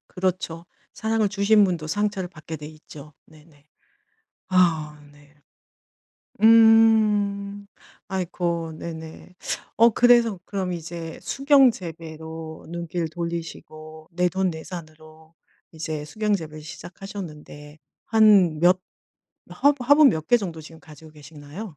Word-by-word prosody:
그렇죠. 180 Hz, -2 st, -3 dB, 0.3 s
사랑을 220 Hz, -1 st, 0 dB
주신 205 Hz, +1 st, +3 dB
분도 175 Hz, -4 st, -2 dB
상처를 195 Hz, +1 st, -2 dB
받게 160 Hz, -2 st, -9 dB
돼 150 Hz, -, -9 dB
있죠. 150 Hz, -1 st, -13 dB
네네. 150 Hz, -2 st, -21 dB, 0.8 s
아 160 Hz, -5 st, +1 dB
네. 145 Hz, 0 st, -22 dB, 1.1 s
음. 215 Hz, -3 st, +4 dB, 0.4 s
아이코. 170 Hz, -3 st, -3 dB
네네. 160 Hz, +2 st, -9 dB, 0.4 s
어 230 Hz, +2 st, +7 dB
그래서 235 Hz, -3 st, +4 dB
그럼 190 Hz, -3 st, -3 dB
이제 165 Hz, -1 st, -7 dB
수경 275 Hz, -2 st, +4 dB
재배로 160 Hz, -4 st, -9 dB
눈길 170 Hz, 0 st, -4 dB
돌리시고 160 Hz, -2 st, -7 dB
내돈내산으로 160 Hz, -3 st, -4 dB, 0.4 s
이제 155 Hz, -2 st, -5 dB
수경 215 Hz, +5 st, -1 dB
재배를 155 Hz, -4 st, -8 dB
시작하셨는데 155 Hz, -3 st, -10 dB, 0.3 s
한 205 Hz, -8 st, +4 dB
몇 180 Hz, +2 st, +4 dB, 0.7 s
화분 285 Hz, -3 st, +1 dB
화분 290 Hz, +1 st, +7 dB
몇 160 Hz, -9 st, -2 dB
개 240 Hz, -, +5 dB
정도 175 Hz, -8 st, -5 dB
지금 160 Hz, +1 st, -13 dB
가지고 155 Hz, 0 st, -15 dB
계시나요? 150 Hz, +4 st, -11 dB
170 Hz, 235 characters per minute, -23 LUFS, 155-200 Hz, 1.1 s, 어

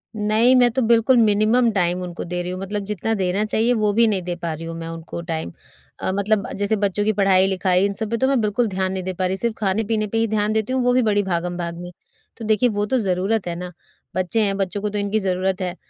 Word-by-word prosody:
नहीं, 215 Hz, +4 st, +3 dB
मैं 245 Hz, -1 st, +5 dB
तो 260 Hz, +3 st, 0 dB
बिल्कुल 235 Hz, +2 st, +4 dB
मिनिमम 220 Hz, +3 st, +3 dB
टाइम 180 Hz, -3 st, 0 dB
उनको 175 Hz, -1 st, -6 dB
दे 175 Hz, 0 st, -3 dB
रही 175 Hz, 0 st, -4 dB
हूँ, 185 Hz, -, -5 dB
मतलब 200 Hz, +1 st, -4 dB
जितना 210 Hz, +2 st, -2 dB
देना 190 Hz, +1 st, 0 dB
चाहिए 225 Hz, +3 st, +1 dB
वो 215 Hz, -3 st, +1 dB
भी 230 Hz, +2 st, +4 dB
नहीं 200 Hz, -4 st, 0 dB
दे 175 Hz, 0 st, -3 dB
पा 170 Hz, -1 st, -4 dB
रही 160 Hz, +1 st, -7 dB
हूँ 165 Hz, 0 st, -6 dB
मैं 165 Hz, 0 st, -6 dB
उनको 165 Hz, +1 st, -7 dB
टाइम। 160 Hz, -, -4 dB, 0.5 s
अ, -, -, -1 dB
मतलब 200 Hz, 0 st, 0 dB
जैसे 205 Hz, +2 st, +1 dB
बच्चों 200 Hz, +1 st, +1 dB
की 215 Hz, -, +2 dB
पढ़ाई-लिखाई 190 Hz, -1 st, +3 dB
इन 200 Hz, -, -1 dB
सब 215 Hz, +2 st, -4 dB
पे 230 Hz, -, +1 dB
तो 265 Hz, -, +2 dB
मैं 270 Hz, -2 st, +2 dB
बिल्कुल 215 Hz, +3 st, +1 dB
ध्यान 190 Hz, -1 st, -2 dB
नहीं 190 Hz, -1 st, -3 dB
दे 185 Hz, +1 st, -3 dB
पा 185 Hz, +1 st, -2 dB
रही, 185 Hz, +1 st, -1 dB
सिर्फ़ 230 Hz, +2 st, -2 dB
खाने-पीने 215 Hz, +2 st, 0 dB
पे 225 Hz, -, -3 dB
ही 225 Hz, 0 st, +2 dB
ध्यान 215 Hz, 0 st, 0 dB
देती 220 Hz, +3 st, -1 dB
हूँ, 260 Hz, -, +1 dB
वो 245 Hz, 0 st, +3 dB
भी 255 Hz, -, +4 dB
बड़ी 205 Hz, -2 st, +2 dB
भागम-भाग 175 Hz, -2 st, -3 dB
में। 175 Hz, 0 st, -8 dB, 0.5 s
तो 225 Hz, -, -7 dB
देखिए, 215 Hz, +3 st, +3 dB
वो 205 Hz, -1 st, -1 dB
तो 260 Hz, +5 st, 0 dB
ज़रूरत 195 Hz, +1 st, 0 dB
है 170 Hz, -, -3 dB
ना, 180 Hz, +1 st, -6 dB, 0.4 s
बच्चे 185 Hz, +4 st, 0 dB
हैं, 195 Hz, -1 st, 0 dB
बच्चों 195 Hz, 0 st, -2 dB
को 210 Hz, -, -1 dB
तो 210 Hz, -, -4 dB
इनकी 205 Hz, +1 st, 0 dB
ज़रूरत 190 Hz, -1 st, -1 dB
है 180 Hz, -1 st, -3 dB
200 Hz, 255 wpm, -21 LUFS, 180-220 Hz, 0.5 s, मैं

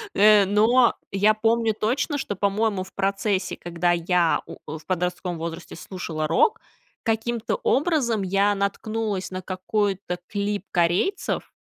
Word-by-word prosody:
Э, 210 Hz, 0 st, +6 dB
но 225 Hz, +5 st, +4 dB, 0.2 s
я 205 Hz, +2 st, +3 dB
помню 225 Hz, 0 st, +1 dB
точно, 260 Hz, +7 st, 0 dB
что, 205 Hz, -7 st, -3 dB
по-моему, 200 Hz, 0 st, 0 dB
в 190 Hz, -, -14 dB
процессе, 195 Hz, -1 st, 0 dB
когда 175 Hz, 0 st, -1 dB
я, 175 Hz, 0 st, +2 dB
у, -, -, -8 dB
э, 160 Hz, -, -8 dB
в -, -, -20 dB
подростковом 180 Hz, -1 st, -2 dB
возрасте 165 Hz, +1 st, -6 dB
слушала 160 Hz, -5 st, -5 dB
рок, 165 Hz, -, +3 dB, 0.4 s
каким-то 225 Hz, -, -1 dB
образом 300 Hz, -, +1 dB
я 200 Hz, +2 st, +2 dB
наткнулась 200 Hz, 0 st, -2 dB
на 185 Hz, 0 st, -5 dB
какой-то 190 Hz, -1 st, -2 dB
клип 205 Hz, -1 st, -2 dB
корейцев, 180 Hz, -, 0 dB
200 Hz, 135 wpm, -24 LUFS, 180-220 Hz, 0.4 s, Э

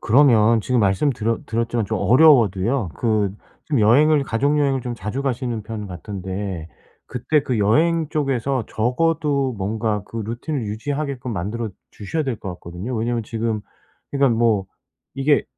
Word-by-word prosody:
그러면 115 Hz, -3 st, +5 dB
지금 125 Hz, +2 st, +1 dB
말씀드렸 110 Hz, +3 st, 0 dB
드렸지만 115 Hz, 0 st, -1 dB
좀 110 Hz, -, -2 dB
어려워도요, 120 Hz, -, +4 dB
그 110 Hz, -4 st, +1 dB, 0.3 s
지금 140 Hz, -7 st, 0 dB
여행을 145 Hz, +7 st, +5 dB
가족 140 Hz, +6 st, +1 dB
여행을 135 Hz, -3 st, +1 dB
좀 120 Hz, 0 st, -4 dB
자주 110 Hz, +6 st, -4 dB
가시는 120 Hz, -4 st, -2 dB
편 105 Hz, -2 st, -6 dB
같은데 95 Hz, -2 st, -5 dB, 0.4 s
그때 145 Hz, +4 st, 0 dB
그 125 Hz, -5 st, -1 dB
여행 155 Hz, +10 st, +2 dB
쪽에서 135 Hz, -5 st, -1 dB
적어도 140 Hz, +2 st, 0 dB
뭔가 105 Hz, +1 st, -1 dB
그 115 Hz, -, -10 dB
루틴을 120 Hz, +5 st, -3 dB
유지하게끔 135 Hz, +3 st, -3 dB
만들어 110 Hz, +4 st, -3 dB, 0.2 s
주셔야 130 Hz, +10 st, -3 dB
될 130 Hz, -5 st, -2 dB
것 100 Hz, -, -8 dB
같거든요. 90 Hz, +8 st, -7 dB
왜냐하면 115 Hz, +1 st, -1 dB
지금 110 Hz, 0 st, -2 dB, 0.5 s
그러니까 140 Hz, -5 st, +2 dB
뭐 110 Hz, -5 st, +2 dB, 0.5 s
이게 140 Hz, +2 st, +2 dB
115 Hz, 335 characters per minute, -21 LUFS, 105-140 Hz, 0.5 s, 그러면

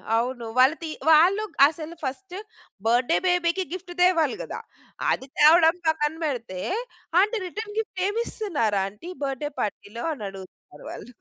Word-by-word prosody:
అవును 240 Hz, +1 st, -1 dB
వాళ్ళు 260 Hz, +5 st, +6 dB
తి 320 Hz, -, -4 dB, 0.2 s
వాళ్ళు 355 Hz, +7 st, +6 dB, 0.2 s
అసలు 320 Hz, +2 st, -7 dB
ఫస్ట్ 355 Hz, +8 st, -5 dB, 0.5 s
బర్త్‌డే‌ 245 Hz, +7 st, +3 dB
బేబీకి 355 Hz, +1 st, +1 dB
గిఫ్ట్ 370 Hz, -1 st, -7 dB
తేవాలి 335 Hz, -6 st, +3 dB
కదా? -, -, -6 dB, 0.5 s
అది 265 Hz, -, -2 dB
తేవడం 320 Hz, +2 st, +6 dB
పక్కన 300 Hz, -1 st, +1 dB
పెడితే, 230 Hz, -10 st, -4 dB, 0.6 s
"ఆంటీ 430 Hz, +3 st, +1 dB
రిటర్న్ 420 Hz, +3 st, -7 dB
గిఫ్ట్ 390 Hz, -4 st, -4 dB
ఏమి 445 Hz, +3 st, -1 dB
ఇస్తున్నారు 285 Hz, -, -1 dB
ఆంటీ 210 Hz, -, -8 dB
బర్త్‌డే‌ 275 Hz, +2 st, -2 dB
పార్టీలో?" 210 Hz, +2 st, -5 dB
అని 225 Hz, -8 st, -7 dB
అడుగుతున్నారు 190 Hz, -6 st, -13 dB
వాళ్ళు. 245 Hz, -, -9 dB
310 Hz, 140 wpm, -25 LUFS, 245-360 Hz, 0.6 s, వాళ్ళు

